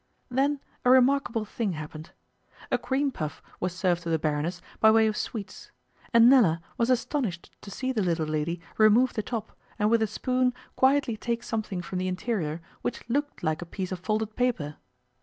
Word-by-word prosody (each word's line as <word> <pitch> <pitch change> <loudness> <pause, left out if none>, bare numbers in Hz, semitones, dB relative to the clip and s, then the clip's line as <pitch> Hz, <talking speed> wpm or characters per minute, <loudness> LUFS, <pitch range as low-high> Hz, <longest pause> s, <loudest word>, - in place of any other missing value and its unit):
Then 275 +3 +1 0.2
a 250 - +3
remarkable 255 -3 +4
thing 210 -2 -2
happened. 155 0 -7 0.6
A - - +2
cream 275 +1 0
puff 155 - -5 0.2
was 180 - -1
served 180 -1 0
to 170 - -5
the 165 - +2
Baroness 155 +3 -1 0.2
by 220 - +7
way 220 0 +5
of 215 -1 +1
sweets, 210 -3 -5 0.4
and 235 -1 +7
Nella 225 -11 +6 0.2
was 235 +1 +1
astonished 240 - -1
to - - -10
see 260 +6 -2
the 230 -5 0
little 170 -4 0
lady 155 +3 -2 0.2
remove 220 +4 +5
the 215 - -1
top, 220 0 -5 0.2
and 210 0 +2
with 230 -1 +4
a 220 - +2
spoon 250 +3 0 0.2
quietly 265 -3 +3
take 235 +1 -2
something 210 -5 -3
from 185 - -4
the 185 - -1
interior 180 -4 -2 0.2
which 245 - -4
looked 290 -1 -1
like 155 0 0
a - - -2
piece 185 +1 -5
of 185 - -3
folded 215 +3 -2
paper. 190 -13 -1
215 Hz, 185 wpm, -27 LUFS, 175-245 Hz, 0.6 s, by